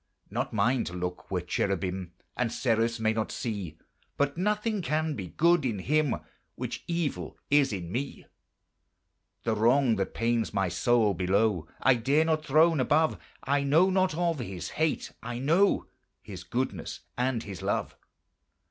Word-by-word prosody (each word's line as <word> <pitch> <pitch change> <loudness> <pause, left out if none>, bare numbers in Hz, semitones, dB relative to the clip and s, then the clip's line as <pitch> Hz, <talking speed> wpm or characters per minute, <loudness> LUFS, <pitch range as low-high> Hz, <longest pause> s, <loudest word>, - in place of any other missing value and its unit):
Not - - -2
mine 115 +4 +2
to 90 - -6
look 90 0 -5
where 90 -2 -1
cherubim 90 -1 -2 0.2
And 125 -2 0
seraphs 115 -1 +1
may 110 0 +2
not 110 0 -2
see, 100 -9 -4 0.4
But 140 0 +1
nothing 210 +3 0
can 155 -1 0
be 95 -8 -5
good 170 - +3
in 115 -6 -1
Him 150 +7 +1 0.4
Which - - -5
evil 170 -3 -2
is 145 -2 +4
in 90 -4 -4
me. 135 +5 -4 1.2
The 115 - +1
wrong 115 +2 +3
that 95 - -2
pains 115 -2 0
my 95 -2 +1
soul 110 +3 +2
below 95 -1 +1
I 135 - +5
dare 135 +7 +2
not 160 -1 +1
throne 160 +1 +4
above, 155 +5 +2 0.2
I 140 +1 +1
know 160 +7 +4
not 185 -3 +2
of 170 -2 0
His 95 -7 -5
hate, 160 0 -1
I 120 +1 -5
know 165 +10 +3 0.4
His 95 -3 -8
goodness 110 -5 -3
and 125 -2 0
His 100 -3 -7
love. - - -1
120 Hz, 155 wpm, -28 LUFS, 100-155 Hz, 1.2 s, I